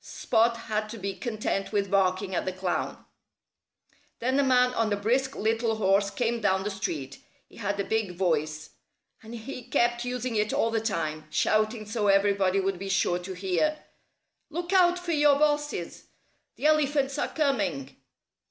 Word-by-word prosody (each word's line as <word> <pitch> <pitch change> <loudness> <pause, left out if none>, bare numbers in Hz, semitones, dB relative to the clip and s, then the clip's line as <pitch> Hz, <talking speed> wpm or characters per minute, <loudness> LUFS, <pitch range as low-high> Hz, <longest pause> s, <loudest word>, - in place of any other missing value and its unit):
Spot 230 0 +1
had 215 -1 -2
to 230 - -7
be 200 -1 -3
content 215 -4 -3
with 200 -2 -1
barking 190 0 +1
at - - 0
the 185 - -1
clown. 185 -1 -3 1.1
Then 260 +3 0
a - - +4
man 250 -1 +3
on 225 -3 0
a - - +3
brisk 250 +7 0
little 225 +1 0
horse 200 -1 +2
came 230 +3 -1
down 190 -2 +2
the 210 - -2
street. 145 -9 -4 0.3
He - - -19
had 200 -2 -2
a - - +1
big 210 -4 -1
voice. 155 -4 -1 0.5
And 225 +1 -9
he 250 +3 -7
kept 240 0 +1
using 250 -1 -3
it 210 0 +1
all 225 - +1
the 225 -1 0
time, 155 -8 -3
shouting 215 +5 +1
so 210 0 -1
everybody 195 -1 +3
would 195 -1 -1
be 195 0 -5
sure 180 -2 +1
to 185 +2 -7
hear, 195 +12 0 0.7
"Look 345 +4 -4
out 360 -2 +5
for 355 -1 -4
your 295 -2 +4
bosses! 295 - -1 0.5
The - - -6
elephants 290 -3 +2
are - - 0
coming!" 200 - -1
215 Hz, 170 wpm, -27 LUFS, 195-250 Hz, 1.1 s, out